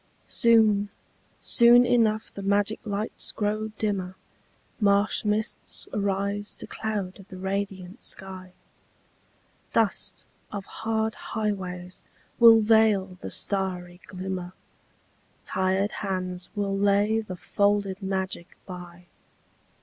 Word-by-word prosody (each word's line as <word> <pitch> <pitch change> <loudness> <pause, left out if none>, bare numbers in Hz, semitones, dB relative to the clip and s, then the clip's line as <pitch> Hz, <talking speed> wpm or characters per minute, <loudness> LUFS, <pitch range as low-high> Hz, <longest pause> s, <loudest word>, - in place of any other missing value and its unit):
Soon, 215 -3 +4 0.5
soon 240 +1 +6
enough 220 -3 +2
the 200 - -6
magic 200 +2 +1
lights 205 +2 -2
grow 215 +1 -1
dimmer, 190 -4 -2 0.6
Marsh 200 0 +3
mists 210 +1 -2
arise 200 0 -1
to - - -9
cloud 200 -3 -4
the 185 - -9
radiant 190 +1 -4
sky, 185 -1 -6 1.2
Dust 205 -3 0 0.3
of 200 -2 -5
hard 220 0 -1
highways 185 -4 -4 0.4
will 230 -1 +9
veil 210 -4 +3
the - - -5
starry 180 -2 -2
glimmer, 185 -1 -5 0.9
Tired 190 +2 +1
hands 185 -2 -3
will 200 -1 -1
lay 205 +2 +3
the 190 -4 -7
folded 200 +1 0
magic 190 -2 -3
by. 180 -1 -10
200 Hz, 100 wpm, -26 LUFS, 185-215 Hz, 1.2 s, will